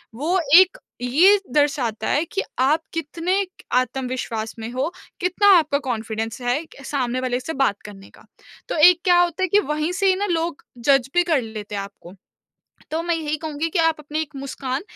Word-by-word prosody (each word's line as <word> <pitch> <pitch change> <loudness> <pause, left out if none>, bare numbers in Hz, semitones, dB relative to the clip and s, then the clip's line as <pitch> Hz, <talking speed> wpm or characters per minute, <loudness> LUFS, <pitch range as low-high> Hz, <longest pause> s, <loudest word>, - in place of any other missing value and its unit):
वो 330 +9 0 0.2
एक 375 +6 +3 0.2
ये 335 +12 +5
दर्शाता 270 -6 0
है 295 - +2
कि 390 +4 -3 0.2
आप 295 +5 +3
कितने 330 +3 -2
क - - +2
एक 370 -2 -9
आत्मविश्वास 250 -3 -2
में 225 +1 -5
हो, 260 +6 -2 0.3
कितना 370 +3 +1
आपका 300 -3 +1
कॉन्फिडेंस 225 0 -3
है 245 +2 +1
एक 325 - -16
सामने 255 -3 -1
वाले 250 -1 -1
से 290 +6 -5
बात 200 -6 0
करने 195 -2 -11
का। - - -19 0.4
तो - - -2
एक 360 -1 +1
क्या 355 -1 +4
होता 350 +1 +1
है - - +2
कि 410 - +5
वहीं 305 -1 -2
से 390 - +4
ही 375 - +4
ना 400 +2 -1
लोग 330 -2 -2 0.3
जज 270 -2 +4
भी 350 0 +4
कर 320 -6 +1
लेते 215 -2 -7
हैं 200 - -2
आपको। 195 -3 -11 0.8
तो 320 +1 -1
मैं 345 0 0
यही 310 -2 -2
कहूँगी 315 +1 -2
कि 360 - -1
आप 325 -1 +3
अपनी 305 +1 -4
एक 310 -2 -6
मुस्कान, 270 0 -4
295 Hz, 200 wpm, -22 LUFS, 245-335 Hz, 0.8 s, ये